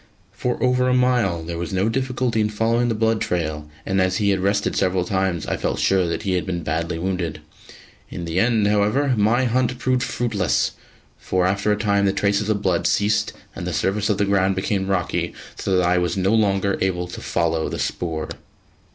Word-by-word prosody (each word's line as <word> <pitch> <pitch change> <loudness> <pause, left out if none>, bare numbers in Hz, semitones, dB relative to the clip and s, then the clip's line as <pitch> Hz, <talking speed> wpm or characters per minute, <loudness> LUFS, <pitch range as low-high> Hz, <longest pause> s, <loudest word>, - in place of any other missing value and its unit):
For 120 +5 -2
over 125 0 +3
a 125 - +3
mile 120 -10 +2
there 85 0 -5
was 85 - -4
no 95 +2 +1
difficulty 125 -1 0
in 105 - +1
following 115 +3 +1
the 115 - 0
blood 110 0 +1
trail, 75 -4 -2 0.2
and 95 0 +1
as 95 0 +1
he 100 -1 +2
had 95 - +1
rested 100 +2 0
several 90 -1 +1
times 95 -4 -1
I - - -2
felt - - -2
sure 95 -2 +2
that 85 - -3
he 100 - -1
had 90 -1 +1
been 85 -3 -3
badly 80 +2 -2
wounded. 85 -3 -2 0.7
In 85 - -6
the 85 +2 -1
end, 115 -1 +3
however, 105 +7 +2
my 115 +4 +2
hunt 125 +1 +1
proved 130 0 +1
fruitless, 110 -8 0 0.5
for 90 -1 0
after 100 +3 +1
a 105 - +2
time 100 -1 +1
the 95 - +2
traces 100 +1 +1
of 105 -1 0
blood 90 -3 +1
ceased 105 +1 +1 0.2
and 90 - -5
the 90 - -2
surface 100 +7 0
of 105 - +2
the 100 - +2
ground 95 -1 +2
became 95 0 -1
rocky, 95 -3 -1 0.2
so 95 -1 0
that 90 - +2
I 90 +1 +3
was 90 +1 -1
no 95 +3 +2
longer 100 -3 +2
able 90 -2 0
to - - -8
follow 80 -1 0
the - - -4
spoor. 80 -3 -3
100 Hz, 205 wpm, -22 LUFS, 90-110 Hz, 0.7 s, over